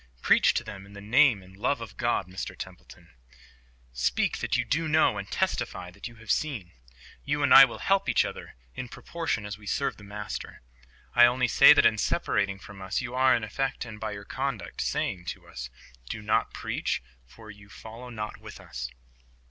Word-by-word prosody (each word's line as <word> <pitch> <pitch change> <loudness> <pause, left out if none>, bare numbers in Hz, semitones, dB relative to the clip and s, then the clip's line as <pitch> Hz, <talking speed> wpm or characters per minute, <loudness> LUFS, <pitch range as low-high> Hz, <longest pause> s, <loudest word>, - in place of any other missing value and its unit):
Preach - - +5
to - - 0
them 100 -1 -9
in 100 - -15
the 100 - -9
name 115 0 +4
and 95 +1 -16
love 100 - 0
of - - -9
God, - - 0
Mr 95 0 -6
Templeton. - - -11 0.8
Speak 65 - 0
that - - 0
you - - 0
do 160 +2 0
know 150 -9 +3
and 100 -1 -7
testify 90 -1 -2
that 100 +6 -8
you 120 - -13
have 110 -1 -5
seen. 115 - -1 0.5
You 145 +1 -1
and 140 - +5
I 135 - +12
will 120 - -7
help 195 0 +1
each - - +3
other, - - -8 0.2
in 125 - -6
proportion 160 -11 -3
as 105 0 -6
we 105 - -13
serve 140 - -1
the 105 - -14
Master. 105 -9 -7 0.5
I 120 0 +8
only 125 0 +1
say - - +8
that - - +4
in - - +4
separating 100 -1 0
from 100 0 -12
us 95 +1 -2
you 125 -1 -5
are 130 0 +4
in 120 - -2
effect, 130 +5 -2
and 110 -2 -9
by 110 -1 -3
your 100 0 -8
conduct, 130 -10 -4
saying 90 -2 -2
to - - -7
us, - - -7 0.4
"Do 105 - -5
not 105 - +1
preach, - - -2 0.2
for 110 - -13
you 100 0 -16
follow 115 +4 -10
not 105 -3 -5
with - - -11
us." 60 0 -6
105 Hz, 200 wpm, -27 LUFS, 100-130 Hz, 0.8 s, I